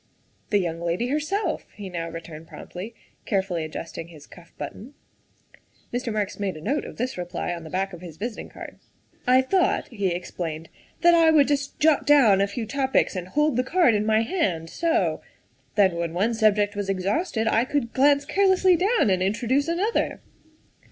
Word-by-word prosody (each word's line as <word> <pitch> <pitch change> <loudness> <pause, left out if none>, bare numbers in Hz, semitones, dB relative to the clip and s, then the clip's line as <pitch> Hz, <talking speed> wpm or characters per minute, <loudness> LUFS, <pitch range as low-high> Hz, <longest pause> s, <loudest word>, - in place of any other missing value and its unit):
" - - -40
The 210 - +3
young 170 -3 -2
lady 175 +8 -1
herself," 315 +5 -1
he 205 -2 -7
now 170 -2 -4
returned 165 -1 -9
promptly, 205 +6 -9 0.3
carefully 190 -5 0
adjusting 165 +1 -6
his 155 -4 -14
cuff 170 -1 -16
button. 260 +7 -8 1.0
Mr. 245 -1 -2
Marks 210 -2 -2
made 195 -5 -2
a - - -10
note 275 - -1
of - - -10
this 250 -4 -3
reply 175 0 -3
on 170 -1 -7
the 160 - -9
back 190 +2 -2
of 175 - -9
his 170 -4 -10
visiting 230 +4 -5
card. - - -10 0.3
" - - -33
I 260 - +4
thought," 365 +7 +1
he 205 -5 -2
explained, 170 -2 -4 0.2
" - - -33
that 345 0 +6
I 330 -1 +6
would 300 -3 +5
just 280 -1 -2
jot 310 -2 +3
down 240 -10 +6
a 200 - +2
few 220 +3 -4
topics 265 -2 +1
and 180 -1 -4
hold 300 +4 +1
the 250 - +2
card 310 -3 +3
in 210 0 0
my 220 +1 +3
hand 185 - -1
so. 335 0 0 0.5
Then 195 -4 +4
when 170 0 -3
one 210 +6 +1
subject 210 -2 +2
was 200 -1 -3
exhausted 220 - -1
I 225 +1 +3
could 260 -3 -2
glance 285 +1 +4
carelessly 375 0 +4
down 375 - +2
and 185 -1 +1
introduce 240 - +1
another." 370 +7 0
215 Hz, 190 wpm, -24 LUFS, 180-285 Hz, 1.0 s, that